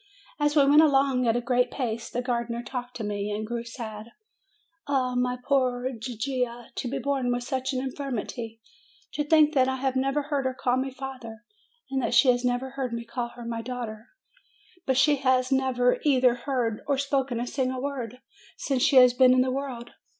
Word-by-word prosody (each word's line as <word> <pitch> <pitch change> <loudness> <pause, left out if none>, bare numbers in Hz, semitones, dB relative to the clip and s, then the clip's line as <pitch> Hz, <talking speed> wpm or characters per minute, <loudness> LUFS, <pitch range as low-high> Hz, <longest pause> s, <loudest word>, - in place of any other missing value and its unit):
As 295 0 +1
we 285 -2 +6
went 290 +2 +7
along 270 -4 +3
at 225 - +3
a 245 - 0
great 250 0 +1
pace, 230 -4 -3
the 245 - -3
gardener 235 -1 -2
talked 250 0 -6
to 225 - -5
me, 205 0 -3
and 210 +1 -3
grew 235 +1 -4
sad. 230 -1 -8 0.7
"Ah, 260 -3 0
my 250 0 0
poor 255 -2 +1
Gigia! 240 0 -4
To - - -4
be 275 - -2
born 265 -2 -1
with 245 0 -1
such 260 0 -2
an 260 - -1
in 265 0 -3
firmity! 235 -4 -5 0.5
To 295 - -1
think 305 0 +4
that 260 -3 +4
I 265 - 0
have 265 0 -1
never 275 +2 +1
heard 285 -2 -2
her 260 0 -1
call 250 -1 0
me 265 +1 -1
father; 255 -4 -8 0.5
that 245 - 0
she 245 +2 +6
has 245 0 -1
never 250 +1 -1
heard 260 -3 -4
me 235 0 -4
call 240 +1 -3
her 240 -1 -9
my 230 -1 -3
daughter; 235 -2 -6 0.8
that 265 -1 +2
she 290 +1 +4
has 260 -1 +1
never 260 -2 +2
either 255 -4 +4
heard 240 -3 -2
or 280 -1 +1
spoken 270 -3 -1
a 240 - -2
single 255 0 -2
word 255 -4 -5 0.4
since 270 -3 -1
she 280 - +3
has 250 -1 +8
been 255 0 +6
in 255 - +4
the 255 0 +1
world! 255 -3 -5
255 Hz, 200 wpm, -26 LUFS, 240-270 Hz, 0.8 s, has